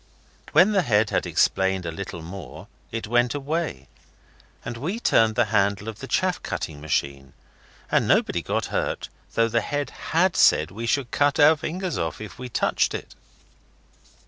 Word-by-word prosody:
When 190 +4 +6
the 200 -2 +3
head 105 -7 +2
had - - 0
explained 95 -1 +1
a 85 - -3
little 85 0 -7
more 90 0 -9 0.2
it 115 0 -4
went 120 +3 +2
away, 145 - -3 0.8
and 120 - -4
we 170 - -3
turned 110 - +3
the 120 -1 +3
handle 100 0 +1
of 110 -2 -6
the - - -7
chaff - - 0
cutting 75 -2 -5
machine, 70 -2 -2 0.6
and - - +2
nobody - - +2
got - - -2
hurt, - - -2 0.3
though 115 0 +3
the 115 +1 +1
head 145 +6 -3 0.2
HAD 175 +3 +3
said 75 +2 +4
we 115 +4 -5
should 125 0 0
cut 145 +1 +2
our 155 +2 +7
fingers 175 +3 -4
off 80 -2 -3
if 110 0 -9
we 125 -1 -6
touched - - +1
it. - - -7
115 Hz, 170 wpm, -24 LUFS, 95-145 Hz, 0.8 s, our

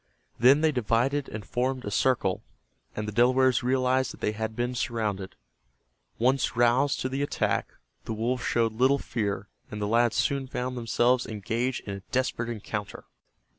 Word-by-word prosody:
Then 135 +6 +6
they 160 -1 +4
divided 125 +3 0
and 105 -2 -7
formed 130 +1 -1
a 105 - -4
circle, 115 -6 +1 0.5
and 105 0 -3
the - - -3
Delawares 125 +2 +4
realized 130 0 +1
that - - -12
they - - 0
had 110 +1 -4
been 120 +2 -1
surrounded. 105 -6 -2 0.8
Once 130 +3 +1
roused 120 +4 +3
to - - 0
the 135 +2 -2
attack, 145 - 0 0.4
the 115 - -3
wolves 120 +3 -1
showed 115 -2 +1
little 130 +5 +3
fear, 105 -6 -3 0.2
and 105 - -6
the 105 - -1
lads 115 +1 +3
soon 140 -1 0
found 125 0 -3
themselves 120 +1 +1
engaged 115 +4 -2
in 100 - -6
a 100 - -6
desperate 125 -2 -1
encounter. 105 -2 -5
120 Hz, 165 wpm, -27 LUFS, 110-130 Hz, 0.8 s, Then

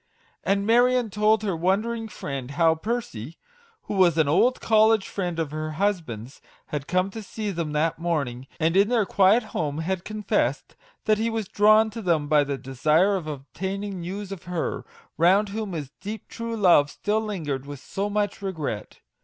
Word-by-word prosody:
And 200 0 +1
Marion 245 0 +3
told 210 +2 +2
her 195 -4 -1
wondering 215 +7 0
friend 140 - -6
how 160 +3 +3
Percy 165 - -4 0.5
(who - - -5
was 180 -4 +4
an 160 -3 +3
old 235 - +3
college 220 -2 +4
friend 180 -4 -3
of 160 -3 -2
her 155 0 -4
husband's) 155 - -2 0.3
had 145 -2 -4
come 185 +2 +1
to 225 - -6
see 210 0 -4
them 165 -4 -3
that 155 +1 0
morning, 140 -7 -2
and 165 +1 +1
in 200 +2 +5
their 235 -4 +2
quiet 200 +5 +4
home 150 -8 -3
had 175 +2 -2
confessed 215 -1 -1 0.3
that 215 -1 +3
he 225 +1 +1
was 225 -3 -3
drawn 215 +2 +4
to 225 +1 -6
them 165 -6 +1
by 150 -1 +4
the 140 -1 -3
desire 150 +10 +2
of 175 -5 -4
obtaining 190 +7 -5
news 195 +3 -5
of 195 -3 -8
her, 175 -2 -3 0.3
round 195 +5 +4
whom 210 -1 -4
his 145 -5 -5
deep 215 +2 -6
true 230 0 -5
love 175 -8 +5
still 210 +7 -1
lingered 150 -11 -4
with 145 -2 -7
so 200 +9 -3
much 205 -1 -1
regret. 160 - -5
190 Hz, 180 wpm, -25 LUFS, 155-210 Hz, 0.5 s, in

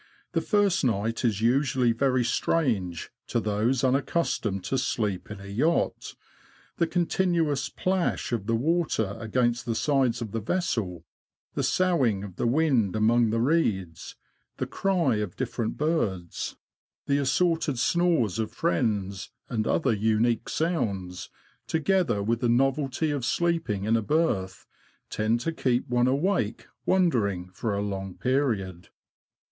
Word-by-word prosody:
The - - 0
first 205 -4 +2
night 115 -1 0
is 110 -4 +1
usually 125 0 +2
very 130 +1 +1
strange 110 - 0 0.2
to 120 - 0
those 110 +5 0
unaccustomed 130 - 0
to 135 - -1
sleep 105 -7 -2
in 105 -1 -7
a 100 - -10
yacht 130 +13 0 0.3
— - - -30
the 170 - +3
continuous 170 -4 0
plash 185 -7 -1
of 115 -4 -2
the 115 - +2
water 135 - 0
against 120 +1 0
the 115 - 0
sides 130 -2 +1
of 115 -4 -5
the 115 - -2
vessel, 105 - -2 0.5
the - - -1
soughing 135 - +2
of 95 -4 -9
the - - 0
wind 125 - +2
among 115 +2 +3
the 115 +1 0
reeds, 110 - 0 0.4
the - - -1
cry 175 - +1
of 105 -4 -3
different 120 -3 -3
birds, 105 - -2 0.5
the 140 0 +2
assorted 150 +1 +1
snores 155 - +2
of 110 - -2
friends, 95 +1 -1 0.2
and 110 -3 -1
other 135 -7 +2
unique 110 +4 +1
sounds, 110 - -2 0.4
together 160 - +1
with 115 +2 0
the 120 -1 +1
novelty 135 +4 +1
of 140 -4 -2
sleeping 165 - 0
in 110 +2 +2
a 115 - +2
berth, 105 - 0 0.5
tend 110 +2 +1
to 165 - -1
keep 125 -6 0
one 125 0 +2
awake 140 - 0 0.2
wondering 105 - +1
for 105 +1 -2
a 100 - -1
long 95 -2 -4
period. 110 -10 -1
120 Hz, 140 wpm, -27 LUFS, 105-150 Hz, 0.5 s, the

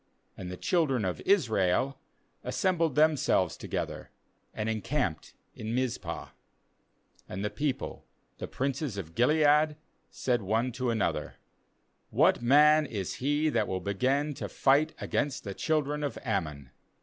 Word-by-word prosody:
And 90 -2 -7
the 90 - -6
children 135 - +1
of 90 - -3
Israel 130 - +2 0.4
assembled 170 -6 0
themselves 150 - +3
together, - - -5 0.4
and 105 0 -4
encamped 110 - -2 0.2
in 110 +2 -4
Mizpah. 130 -1 -3 1.0
18And 95 +2 -4
the 105 - -1
peo 145 -2 0
ple, 135 - -8 0.3
the - - -4
princes 135 -3 -2
of 85 -4 -6
Gilead, 150 - +4 0.3
said 125 -3 -1
one 110 +6 0
to 125 +1 -2
another: 115 -3 -1 0.7
'What - - +3
man 150 +4 +5
is 100 -8 -4
he 145 +4 +1
that - - +1
will 95 - -2
begin 130 +10 0
to - - -6
fight 145 +4 +2
against 140 -3 -1
the 100 - -5
children 150 +3 -1
of 145 - -3
Ammon? 75 - -3
130 Hz, 135 wpm, -29 LUFS, 105-150 Hz, 1.0 s, man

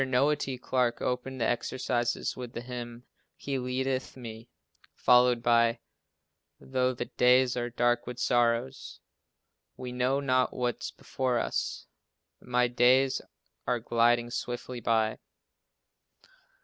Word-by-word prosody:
Noah 135 +3 +2
T. 135 -3 -4
Clarke 125 -1 0
opened 130 +1 -3
the 115 - +1
exercises 120 0 -1
with 125 -2 -7
the 120 - -5
hymn 120 -1 -7 0.3
"He 140 -2 -3
leadeth 130 +1 -2
me," 115 -2 -9 0.5
followed 125 -1 +4
by 115 0 +4 0.8
"Though 130 -1 -1
the - - -3
days 125 0 +3
are 120 -1 -2
dark 120 0 +1
with 125 -1 -6
sorrow," 120 +1 +2 1.1
"We 125 -1 -6
know 125 +2 +1
not 130 -2 +1
what's 125 -1 -2
before 130 -2 -2
us," - - -2 0.6
"My 125 0 +1
days 125 +2 +3 0.5
are 125 -1 +1
gliding 120 +1 +2
swiftly 120 +1 -4
by." 110 -2 +1
125 Hz, 120 wpm, -29 LUFS, 120-130 Hz, 1.1 s, followed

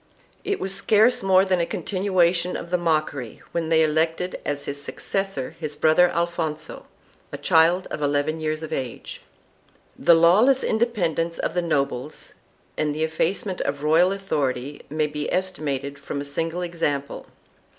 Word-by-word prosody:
It 405 - -1
was 190 0 -2
scarce 220 +5 +3
more 190 0 +4
than 185 -2 +1
a 170 - +1
continuation 180 -3 +1
of 170 - -8
the 180 - +3
mockery 155 -8 -2
when 165 -2 -2
they 160 -1 +4
elected 160 +3 0
as 145 -1 -3
his 140 0 -4
successor 195 -1 -3
his 150 -1 -4
brother 160 +4 +4
Alfonso, 165 -2 -3 0.4
a - - -5
child 170 +1 +3
eleven 145 +2 -1
years 155 0 -2
of 160 0 -5
age.2 130 -5 -5 0.8
The 170 - +7
lawless 210 +11 +5
independence 175 -8 0
of - - -2
the 175 - +1
nobles 140 -4 -2 0.4
and 150 -1 -1
the 155 - -1
effacement 180 +4 -1
of 140 0 -1
the 145 - -12
royal 165 +4 +4
authority 145 -8 -2
may 155 +1 0
be 150 0 -4
estimated 145 -7 -2
from 140 0 -5
a 140 - -4
single 165 +5 -3
example. 150 -5 -3
165 Hz, 150 wpm, -23 LUFS, 150-180 Hz, 0.8 s, The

